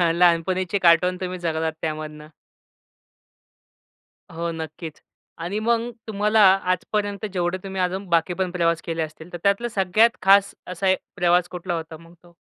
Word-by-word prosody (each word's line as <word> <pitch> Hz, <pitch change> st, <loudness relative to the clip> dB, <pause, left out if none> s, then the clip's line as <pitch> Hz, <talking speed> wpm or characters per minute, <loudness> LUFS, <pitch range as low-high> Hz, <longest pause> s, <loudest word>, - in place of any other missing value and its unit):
लहानपणीचे 180 Hz, +2 st, +2 dB
कार्टून 180 Hz, +1 st, +4 dB
तुम्ही 185 Hz, 0 st, -4 dB
जगलात 160 Hz, -2 st, -1 dB
त्यामधून! 155 Hz, -1 st, -5 dB, 2.0 s
हो, 170 Hz, +1 st, -3 dB
नक्कीच. 160 Hz, 0 st, -7 dB, 0.4 s
आणि 175 Hz, +5 st, -3 dB
मग 235 Hz, +1 st, 0 dB, 0.2 s
तुम्हाला 210 Hz, +1 st, +2 dB, 0.3 s
आजपर्यंत 205 Hz, +2 st, -2 dB
जेवढे 180 Hz, 0 st, -1 dB
तुम्ही 190 Hz, -1 st, -4 dB
अजून 185 Hz, +1 st, -2 dB
बाकी 170 Hz, +1 st, +1 dB
पण 185 Hz, -1 st, -2 dB
प्रवास 170 Hz, -2 st, 0 dB
केले 165 Hz, -1 st, -2 dB
असतील, 160 Hz, +2 st, -8 dB
तर 175 Hz, -, -5 dB
त्यातलं 200 Hz, +4 st, +1 dB
सगळ्यात 210 Hz, +5 st, +3 dB
खास 195 Hz, +1 st, +5 dB
असा 180 Hz, +2 st, -2 dB
एक 190 Hz, -, +3 dB, 0.2 s
प्रवास 175 Hz, -1 st, +2 dB
कुठला 175 Hz, 0 st, -4 dB
होता 160 Hz, -1 st, -6 dB
मग 165 Hz, +1 st, -17 dB
तो? 175 Hz, -1 st, -20 dB
180 Hz, 145 wpm, -23 LUFS, 165-195 Hz, 2.0 s, खास